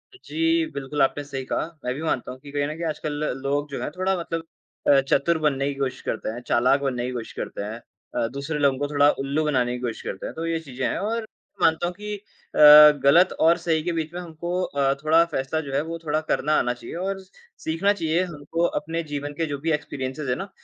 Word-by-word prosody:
जी, 330 Hz, -2 st, 0 dB
बिल्कुल, 140 Hz, +1 st, -3 dB
आपने 145 Hz, +2 st, +2 dB
सही 135 Hz, -2 st, -5 dB
कहा। -, -, -1 dB, 0.2 s
मैं 125 Hz, -, 0 dB
भी 150 Hz, -, -6 dB
मानता 125 Hz, -5 st, -1 dB
हूँ 130 Hz, -, -10 dB
कि 145 Hz, 0 st, -12 dB
कहीं 145 Hz, 0 st, 0 dB
न 155 Hz, -, -4 dB
कहीं, 170 Hz, -, -5 dB
आजकल 155 Hz, 0 st, -3 dB, 0.3 s
लोग 145 Hz, +1 st, -1 dB
जो -, -, -4 dB
हैं, -, -, -2 dB
थोड़ा 185 Hz, +3 st, 0 dB
मतलब 165 Hz, -1 st, -4 dB, 0.4 s
अ, 140 Hz, -1 st, +7 dB
चतुर 140 Hz, +5 st, +2 dB
बनने 140 Hz, -2 st, +1 dB
की -, -, -12 dB
कोशिश 135 Hz, -2 st, -2 dB
करते 110 Hz, -, -3 dB
हैं, 120 Hz, +2 st, -5 dB
चालाक 125 Hz, +4 st, +3 dB
बनने 125 Hz, -3 st, -1 dB
की 125 Hz, -, -3 dB
कोशिश 115 Hz, -2 st, -6 dB
करते -, -, -5 dB
हैं 110 Hz, +3 st, -6 dB, 0.4 s
अ, 120 Hz, -1 st, +1 dB
दूसरे 140 Hz, +3 st, -3 dB
लोगों 140 Hz, -2 st, +3 dB
को 145 Hz, -, 0 dB
थोड़ा 145 Hz, 0 st, +5 dB
उल्लू 145 Hz, +3 st, 0 dB
बनाने 125 Hz, -4 st, +1 dB
की -, -, -8 dB
कोशिश 120 Hz, -3 st, -3 dB
करते 95 Hz, -, -6 dB
हैं। -, -, -5 dB
तो 165 Hz, +1 st, -4 dB
ये 165 Hz, -1 st, 0 dB
चीज़ें 130 Hz, -4 st, -5 dB
हैं, -, -, -1 dB
और 225 Hz, +3 st, -1 dB
मैं 220 Hz, -, -17 dB
मानता 160 Hz, +2 st, +2 dB
हूँ 180 Hz, -, -4 dB
कि 210 Hz, +1 st, -5 dB
अ, -, -, -9 dB, 0.8 s
गलत 170 Hz, +7 st, +6 dB
और 165 Hz, +2 st, +5 dB
सही 165 Hz, -2 st, 0 dB
के 175 Hz, -, -1 dB
बीच 160 Hz, 0 st, -3 dB
में 180 Hz, -, -4 dB
हमको 170 Hz, +2 st, -4 dB
अ, 140 Hz, -3 st, +1 dB
थोड़ा 160 Hz, +2 st, +5 dB
फ़ैसला 155 Hz, -1 st, -2 dB
जो 140 Hz, -3 st, -7 dB
है, 140 Hz, -, +2 dB
वो 165 Hz, +1 st, -5 dB
थोड़ा 155 Hz, +1 st, +1 dB
करना 155 Hz, -, +1 dB
आना 120 Hz, 0 st, 0 dB
चाहिए 120 Hz, +5 st, -9 dB
और 190 Hz, +2 st, -2 dB, 0.4 s
सीखना 170 Hz, +6 st, +1 dB
चाहिए। 170 Hz, -1 st, 0 dB
हमको 165 Hz, 0 st, -2 dB, 0.2 s
अपने 165 Hz, +2 st, -3 dB
जीवन 145 Hz, 0 st, -3 dB
के 165 Hz, -, 0 dB
जो 145 Hz, -2 st, -3 dB
भी 160 Hz, +2 st, -1 dB
एक्सपीरियंसेज़ 140 Hz, -1 st, -3 dB
हैं 125 Hz, -, +2 dB
ना, 195 Hz, +1 st, -6 dB
150 Hz, 240 wpm, -24 LUFS, 135-165 Hz, 0.8 s, अ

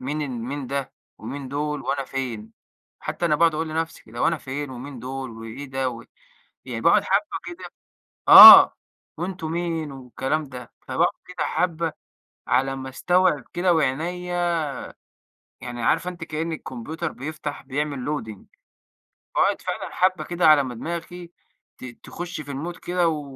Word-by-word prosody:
مين 150 Hz, +3 st, -2 dB
ال 145 Hz, -, -3 dB
مين 130 Hz, +3 st, -5 dB
ده 140 Hz, +1 st, -4 dB, 0.3 s
ومين 135 Hz, +4 st, -7 dB
دول 150 Hz, +1 st, -3 dB
وأنا 140 Hz, -1 st, -2 dB
فين. 115 Hz, -5 st, -5 dB, 0.5 s
حتّى 175 Hz, -, -4 dB
أنا 150 Hz, -2 st, +2 dB
باقعد 165 Hz, -1 st, +3 dB
أقول 160 Hz, +1 st, -2 dB
لنفسي 160 Hz, +1 st, -4 dB
كده، 115 Hz, +2 st, -11 dB
هو -, -, +2 dB
أنا 165 Hz, -2 st, -1 dB
فين 140 Hz, +1 st, -5 dB
ومين 130 Hz, +1 st, -8 dB
دول 130 Hz, +1 st, -6 dB
وإيه 115 Hz, +5 st, -8 dB
ده 130 Hz, -1 st, -1 dB
و 115 Hz, -, -10 dB, 0.6 s
يعني -, -, -5 dB
باقعد -, -, +4 dB
حبه -, -, 0 dB, 0.2 s
كده -, -, -10 dB, 0.6 s
آه -, -, +12 dB, 0.4 s
وأنتم 175 Hz, -2 st, -4 dB
مين 165 Hz, -3 st, -2 dB
والكلام 135 Hz, +3 st, -3 dB
ده، 125 Hz, -2 st, -10 dB
فباقعد -, -, 0 dB
كده 180 Hz, -1 st, -4 dB
حبة، 165 Hz, -2 st, -1 dB, 0.6 s
على 135 Hz, +1 st, +1 dB
ما 130 Hz, 0 st, -6 dB
أستوعب 175 Hz, +1 st, +2 dB
كده 175 Hz, 0 st, +2 dB
وعينيَّ 160 Hz, +5 st, -1 dB, 1.4 s
يعني 120 Hz, -1 st, -6 dB
عارفة 180 Hz, -, +1 dB
أنتِ 175 Hz, -2 st, -8 dB
كأن 160 Hz, +1 st, -4 dB
الكمبيوتر 155 Hz, +3 st, -5 dB
بيفتح 150 Hz, +1 st, -6 dB
بيعمل 140 Hz, -1 st, -3 dB
loading 110 Hz, -9 st, -5 dB, 0.9 s
فباقعد -, -, +2 dB
فعلًا -, -, -4 dB
حبة 185 Hz, 0 st, +2 dB
كده 175 Hz, -1 st, +1 dB
على 150 Hz, -2 st, +6 dB
ما 125 Hz, -2 st, -6 dB
دماغي 170 Hz, +5 st, -6 dB, 0.5 s
ت -, -, -10 dB, 0.2 s
تخش 175 Hz, -2 st, -6 dB
في 145 Hz, -, -8 dB
المود 165 Hz, +6 st, -5 dB
كده 175 Hz, -1 st, 0 dB
و 155 Hz, -2 st, -3 dB
150 Hz, 155 wpm, -23 LUFS, 130-165 Hz, 1.4 s, آه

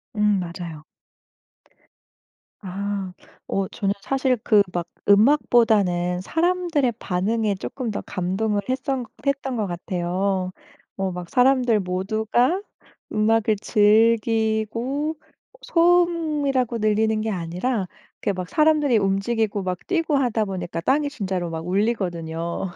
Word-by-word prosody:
음 210 Hz, -2 st, +2 dB
맞아요. 170 Hz, -3 st, -6 dB, 1.8 s
아. 195 Hz, -1 st, -4 dB, 0.3 s
어 195 Hz, -1 st, -1 dB
저는 200 Hz, -3 st, -1 dB
사실 260 Hz, +2 st, +1 dB
그 210 Hz, -2 st, +5 dB
막 175 Hz, -1 st, -2 dB, 0.2 s
음악보다는 200 Hz, -7 st, +3 dB
사람들의 330 Hz, -, +1 dB
반응에 205 Hz, +3 st, 0 dB
쪼끔 235 Hz, +4 st, -5 dB
더 -, -, -3 dB
감동을 200 Hz, +3 st, -1 dB
했었 260 Hz, 0 st, -1 dB, 0.2 s
했던 275 Hz, -2 st, -1 dB
것 210 Hz, -3 st, -1 dB
같아요. 185 Hz, +2 st, -2 dB, 0.4 s
뭐 190 Hz, -1 st, -2 dB
막 180 Hz, -1 st, -7 dB
사람들 250 Hz, -3 st, +3 dB
모두가 215 Hz, -, 0 dB, 0.5 s
음악을 215 Hz, 0 st, +2 dB
즐기고 225 Hz, +6 st, +2 dB
어 -, -, -28 dB
소음이라고 315 Hz, -8 st, +2 dB
들리는 215 Hz, +1 st, +2 dB
게 220 Hz, -, -2 dB
아니라 185 Hz, +4 st, -2 dB, 0.3 s
이렇게 200 Hz, -, 0 dB
막 180 Hz, -1 st, -5 dB
사람들이 300 Hz, -5 st, +3 dB
움직이고 200 Hz, +1 st, 0 dB
막 180 Hz, -1 st, -2 dB
뛰고 330 Hz, -5 st, +1 dB
하다 235 Hz, -5 st, +1 dB
보니까 180 Hz, -3 st, -4 dB
땅이 285 Hz, -, +1 dB
진짜로 190 Hz, -, -3 dB
막 165 Hz, +1 st, -5 dB
울리거든요. 175 Hz, -4 st, -1 dB
215 Hz, 255 characters per minute, -23 LUFS, 185-255 Hz, 1.8 s, 그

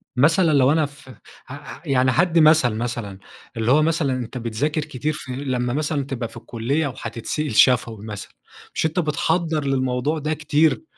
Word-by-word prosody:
مثلًا 160 Hz, +6 st, +4 dB
لو 135 Hz, 0 st, +4 dB
أنا 155 Hz, -1 st, +2 dB
ف 140 Hz, -2 st, -13 dB, 0.4 s
ع 135 Hz, -, -6 dB
ع 145 Hz, -, -11 dB
يعني 130 Hz, -3 st, +2 dB
هادِّي 170 Hz, +3 st, +3 dB
مثل 155 Hz, -5 st, +5 dB
مثلًا، 115 Hz, -4 st, -4 dB, 0.4 s
اللي 115 Hz, +2 st, +1 dB
هو 150 Hz, +3 st, +5 dB
مثلًا 155 Hz, -4 st, +1 dB
أنت 125 Hz, 0 st, -5 dB
بتذاكر 125 Hz, +7 st, -1 dB
كتير 150 Hz, 0 st, -3 dB
في 140 Hz, -4 st, -8 dB
لمّا 125 Hz, -3 st, -2 dB
مثلًا 145 Hz, -1 st, -1 dB
تبقى 125 Hz, -4 st, -4 dB
في -, -, -13 dB
الكلية 120 Hz, +6 st, -2 dB
وهتتسأل 120 Hz, +3 st, -4 dB
شفوي 115 Hz, -3 st, +3 dB
مثلًا، 105 Hz, -2 st, -7 dB, 0.4 s
مش -, -, 0 dB
أنت 160 Hz, +3 st, 0 dB
بتحضّر 160 Hz, 0 st, 0 dB
للموضوع 130 Hz, +3 st, 0 dB
ده 155 Hz, +1 st, -1 dB
كتير؟ 155 Hz, -, +1 dB
140 Hz, 170 wpm, -22 LUFS, 125-155 Hz, 0.4 s, مثل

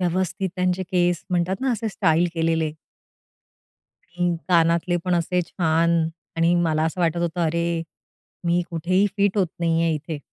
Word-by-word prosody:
व्यवस्थित 185 Hz, +1 st, -1 dB
त्यांचे 180 Hz, 0 st, 0 dB
केस 175 Hz, -3 st, 0 dB
म्हणतात 180 Hz, +1 st, +1 dB
ना 265 Hz, 0 st, +1 dB
असे 225 Hz, -1 st, -2 dB
स्टाईल 175 Hz, -3 st, +2 dB
केलेले. 165 Hz, -1 st, 0 dB, 1.3 s
हं. 175 Hz, 0 st, -1 dB
कानातले 170 Hz, 0 st, +3 dB
पण 180 Hz, -1 st, +1 dB
असे 175 Hz, +1 st, +1 dB
छान. 165 Hz, -1 st, +1 dB, 0.3 s
आणि 165 Hz, +1 st, +3 dB
मला 160 Hz, -3 st, +1 dB
असं 160 Hz, +3 st, -2 dB
वाटत 170 Hz, -1 st, +1 dB
होतं, 170 Hz, 0 st, -2 dB
"अरे, 170 Hz, +1 st, 0 dB, 0.6 s
मी 175 Hz, +1 st, +2 dB
कुठेही 185 Hz, +4 st, +1 dB
फिट 200 Hz, 0 st, +2 dB
होत 190 Hz, -, +3 dB
नाहीये 165 Hz, 0 st, +2 dB
इथे." 155 Hz, +1 st, -5 dB
170 Hz, 145 wpm, -23 LUFS, 165-180 Hz, 1.3 s, कानातले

